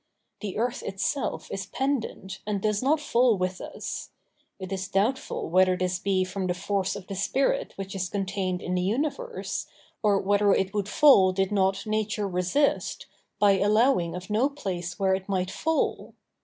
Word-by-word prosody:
The 205 -3 -5
earth 240 +4 -1
itself 195 +8 -2
is 195 -1 -4
pendent 250 -7 -2
and 205 -2 0
does 210 0 0
not 290 +4 +3
fall 245 -6 +3
with 185 0 -2
us; - - -6 0.5
it 190 -1 -7
is 190 -1 -3
doubtful 215 +8 0
whether 185 +2 +4
this 180 -1 -1
be 190 -1 +1
from 185 0 -3
the 180 - 0
force 195 +1 -1
of 200 -2 -8
the 195 - -6
spirit 270 - 0
which 195 0 -6
is 185 -2 -2
contained 195 -2 -2
in 180 - -2
the 180 - +1
universe, 300 - -2 0.3
or 205 -2 +3
whether 200 +1 +3
it 190 +1 0
would 205 -1 -1
fall 205 -10 +6
did 195 +1 0
not 195 -1 +1
nature 215 -1 -1
resist, 185 +11 0 0.3
by 200 -2 +4
allowing 205 -4 +3
of 180 +3 -7
no 235 +7 +3
place 180 -11 -5
where 190 -1 +2
it 190 +1 -3
might 185 -1 0
fall. 320 0 -1
195 Hz, 170 wpm, -27 LUFS, 185-220 Hz, 0.5 s, fall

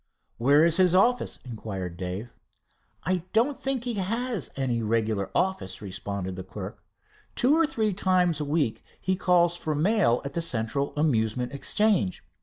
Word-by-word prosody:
"Where 140 +6 +5
is 165 -1 +5
his 185 -1 +4
office?" 245 +6 +2
inquired 100 -7 -5
Dave. 95 +6 -5 0.7
"I 185 +3 +1 0.2
don't 245 +6 +3
think 270 -3 -2
he 245 -1 -2
has 225 - -2
any 125 -4 -1
regular 110 -2 0
office," 185 - -1
responded 100 -1 -5
the 95 - -6
clerk. - - -8 0.5
"Two 265 +5 +3
or 325 -1 +3
three 220 -9 0
times 180 -4 +2
a - - -1
week 140 -7 0 0.2
he 185 - 0
calls 175 -2 +3
for 155 -3 -2
mail 170 - +3
at 140 - -5
the 170 - -1
Central 140 -1 0
Amusement 125 -4 0
Exchange. 185 - +1
150 Hz, 155 wpm, -26 LUFS, -, 0.7 s, Where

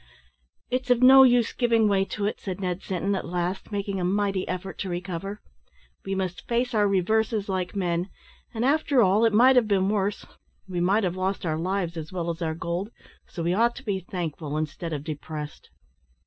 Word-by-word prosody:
"It's 255 0 -1
of 245 0 +3
no 265 +1 +9
use 245 -3 +4
giving 230 -3 +3
way 195 -1 +2
to 205 +1 -4
it," 210 - -2
said 190 -1 -5
Ned 180 -1 -2
Sinton, 190 +2 -2
at 195 - -2
last, 180 +4 -3
making 200 -1 -2
a - - -2
mighty 195 +1 0
effort 185 -1 -5
to 195 - -3
recover: 180 +3 -5 0.6
"we 195 - -3
must 185 -2 -4
face 245 +1 0
our 210 -2 +3
reverses 215 +2 +1
like 185 -1 -2
men; 175 -1 -1 0.4
and, 230 +1 -2
after 280 -3 +3
all, 200 +4 +4
it 225 - +4
might 250 +5 +6
have 235 -3 +4
been 195 -2 +2
worse. 205 -1 -1 0.4
We 180 -2 -3
might 195 +5 +2
have 180 -1 -1
lost 190 0 -2
our 155 -1 -1
lives 180 -1 -2
as 160 -1 -6
well 170 -2 -2
as 165 +1 -8
our 160 -1 -1
gold, 170 +5 -3 0.4
so 170 - -6
we 170 +2 +1
ought 235 +4 +2
to - - -10
be 200 -3 -1
thankful 165 -5 -4
instead 155 +2 -4
of 145 -2 -4
depressed." 150 -1 -7
190 Hz, 200 wpm, -26 LUFS, 175-215 Hz, 0.6 s, no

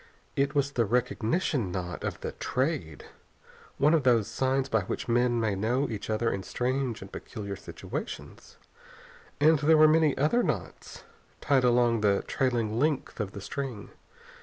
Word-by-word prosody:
It 140 +2 0
was 140 0 +1
the 120 -4 +1
recognition 125 - 0
knot 90 -1 -5
of - - -4
the - - -4
Trade, 130 - -2 0.7
one 150 +3 +4
of 165 - +4
those 120 -5 +3
signs 130 +3 0
by 110 -5 +1
which 90 - -4
men 120 0 +2
may 110 -3 +1
know 120 +8 0
each 105 -1 -5
other 110 +1 +1
in 100 - -3
strange 125 +1 -2
and 95 - -12
peculiar 100 -4 -6
situations. - - -8 0.8
And 155 +1 +5
there 155 +2 +5
were 155 0 +8
many 155 -2 +3
other 155 - +3
knots - - -4 0.4
tied 135 -3 +2
along 120 -2 +3
the 100 -2 +2
trailing 120 -4 0
length 145 -3 -1
of 100 -3 -3
the 100 - -7
string. 130 -3 -5
125 Hz, 160 wpm, -28 LUFS, 110-140 Hz, 0.8 s, were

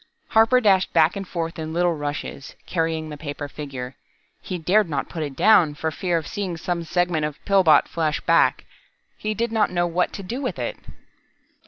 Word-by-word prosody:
Harper 225 +3 +5
dashed 195 -5 +3
back 165 0 +4
and 195 -1 -5
forth 165 -1 -4
in 160 0 -5
little 175 0 +2
rushes, 145 -2 -5
carrying 160 -2 -1
the 150 - -7
paper 145 -1 -6
figure. 135 -4 -7 0.5
He 185 - -4
dared 180 +3 +2
not 145 -3 -2
put 165 - -5
it 145 -3 -4
down, 175 -5 +5
for 160 +1 -2
fear 175 +1 -1
of 160 - -4
seeing 190 -3 -4
some 170 +1 -3
segment 175 -1 0
of 150 -1 -3
Pillbot 190 -6 +5
flash 155 -2 -1
back. - - +2 0.5
He 215 0 -3
did 235 +2 -1
not 220 -2 +2
know 175 -1 0
what 175 +1 0
to 200 - -6
do 240 +9 -5
with 255 - -3
it. - - -3
170 Hz, 190 wpm, -23 LUFS, 155-190 Hz, 0.5 s, Harper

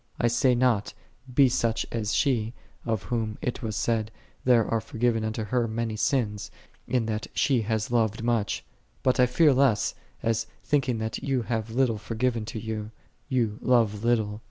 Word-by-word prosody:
6 - - -33
I 120 - +4
say 120 +2 +3
not, 120 -4 +1 0.4
Be 140 +3 +5
thou 125 - -1
such 115 -1 0
as 110 -2 -2
she, 120 -3 +1 0.3
of 110 -3 -1
whom 110 -3 -2
it 125 - -3
was 110 -3 -3
said, 110 -1 0 0.4
"There 120 -3 +5
are 115 -1 0
forgiven 115 0 0
unto 110 0 -2
her 120 +2 0
many 115 0 -2
sins, 105 -3 0 0.4
in 125 -3 +1
that 110 -1 -3
she 130 -5 +2
hath 110 0 -2
loved 115 -2 +1
much; 115 -3 0
"^ - - -37 0.3
but 130 -1 +2
I 125 - +6
fear 150 +3 +4
lest, 130 -5 +3 0.3
as 115 0 0 0.2
thinking 135 -5 +1
that 110 0 -3
thou 135 -3 0
hast 110 -1 -2
little 115 -2 +1
forgiven 115 +1 -1
to 110 0 -5
thee, 110 -1 -4 0.6
thou 105 -1 -7
love 115 -4 +2
little. 110 -3 +1
115 Hz, 180 wpm, -27 LUFS, 110-125 Hz, 0.6 s, I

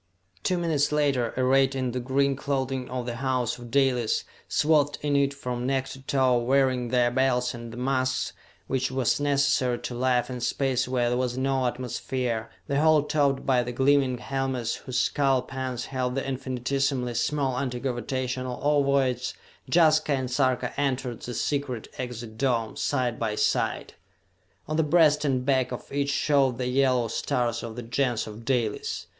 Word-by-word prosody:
Two 180 - 0
minutes 155 -4 +1
later, 140 -6 +1
arrayed 135 +1 +3
in 130 -2 -1
the 125 - -2
green 135 +2 +1
clothing 135 -2 -2
of 125 -1 -3
the 120 -1 -4
House 130 -2 -1
of 120 -1 -10
Dalis, 125 -3 +2 0.2
swathed 145 -2 +2
in 145 -1 +1
it 140 -1 +3
from 125 -3 -4
neck 135 0 0
to 135 - -9
toe, 130 -2 +2
wearing 130 0 +2
their 120 0 +2
belts 125 -1 +1
and 120 -1 -8
the 120 - -9
masks 130 0 0 0.3
which 130 0 -1
were 130 -1 -2
necessary 140 -3 +2
to 125 - -6
life 125 0 +1
in 125 -1 -6
space 130 0 0
where 125 -2 +1
there 125 +1 0
was 125 -1 -1
no 130 -1 +1
atmosphere, 120 -2 -3 0.2
the 140 +1 0
whole 155 -2 +5
topped 140 -3 +1
by 130 -2 +3
the 120 0 -4
gleaming 135 0 +2
helmets 130 -2 -2
whose 130 - -3
skull 135 -3 +2
pans 130 -2 -4
held 130 -1 -2
the 135 0 -2
infinitesimally 130 0 -1
small 135 +1 0
anti 125 -3 -2
gravitational 130 0 -3
ovoids, 140 -3 +1 0.4
Jaska 155 -2 +4
and 130 -2 -2
Sarka 130 -1 +1
entered 130 -4 -2
the 120 - -6
secret 135 -5 -2
exit 120 -3 -6
dome, 120 -5 0
side 125 -4 -1
by 110 -2 -1
side. - - 0 0.7
On 155 - -2
the - - +4
breast 155 -1 +4
and 130 -3 0
back 130 -2 +2
of 125 - -7
each 140 0 0
showed 140 -3 +2
the 125 - -2
yellow 130 -2 +2
stars 120 +1 -1
of 115 -2 -7
the 120 - -6
Gens 120 0 0
of 110 +1 -9
Dalis. 120 -5 -1
130 Hz, 170 wpm, -26 LUFS, 125-140 Hz, 0.7 s, whole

